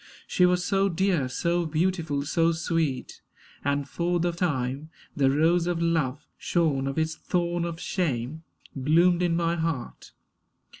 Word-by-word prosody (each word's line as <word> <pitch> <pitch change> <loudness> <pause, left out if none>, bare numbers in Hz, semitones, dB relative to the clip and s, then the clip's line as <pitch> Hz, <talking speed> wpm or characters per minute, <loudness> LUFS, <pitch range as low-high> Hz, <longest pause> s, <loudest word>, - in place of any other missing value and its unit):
She 180 - +3
was 180 0 +1
so 195 0 +2
dear, 175 -6 +1
So 170 +5 0
beautiful, 160 -3 0
so 165 +2 +2
sweet; 160 -5 -2 0.4
and 140 0 0
for 175 +3 -1
the 175 +1 +1
time 145 -4 -2 0.3
The 135 -2 +3
rose 165 +5 +2
of 175 -1 0
love, 155 -4 0
shorn 150 -6 +1
of 135 - -3
its 160 0 0
thorn 175 +1 -1
of 170 -1 -5
shame, 150 - -2 0.3
Bloomed 170 +6 +3
in 175 -2 +2
my 170 0 0
heart. 160 -6 -4
165 Hz, 145 wpm, -26 LUFS, 145-175 Hz, 0.4 s, She